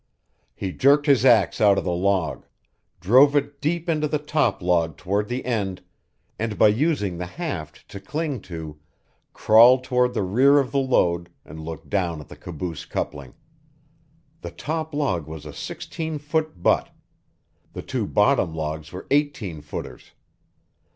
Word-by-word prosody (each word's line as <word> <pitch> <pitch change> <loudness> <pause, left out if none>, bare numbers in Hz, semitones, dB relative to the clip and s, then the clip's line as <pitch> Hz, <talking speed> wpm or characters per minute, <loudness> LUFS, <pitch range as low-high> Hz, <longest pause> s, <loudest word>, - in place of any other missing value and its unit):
He 95 - -4
jerked 145 +7 +3
his 140 -4 +4
axe 110 -8 +4
out 100 -2 +5
of - - 0
the 90 - -1
log, 90 -2 -1 0.5
drove 130 - +5
it 145 0 -1
deep 170 +3 -1
into 155 -2 +1
the 150 - 0
top 150 -6 0
log 85 -3 0
toward 100 +3 -1
the 125 +3 -4
end, 100 -7 -2 0.6
and 110 -1 -3
by - - +6
using 105 - 0
the 90 - -4
haft 90 - -6
to 100 - -8
cling 145 +4 -4
to, 80 -3 -7 0.5
crawled 120 +4 +6
toward 125 -1 +1
the 105 - 0
rear 130 +10 +4
of 135 -3 +1
the 140 - +1
load 85 -10 +1 0.2
and 80 - -10
looked 80 0 -8
down 85 -5 -1
at 75 - -12
the - - -10
caboose 85 -2 -6
coupling. 70 -4 -5 1.1
The - - -6
top 160 +1 -4
log 95 - -1
was 80 -1 -9
a - - -8
sixteen 160 -1 -5
foot 150 - -3
butt; - - +2 0.8
the - - -7
two - - -3
bottom 80 - +2
logs 80 0 -4
were 90 - -8
eighteen 140 - 0
footers. 75 - -8
105 Hz, 155 wpm, -23 LUFS, 85-145 Hz, 1.1 s, by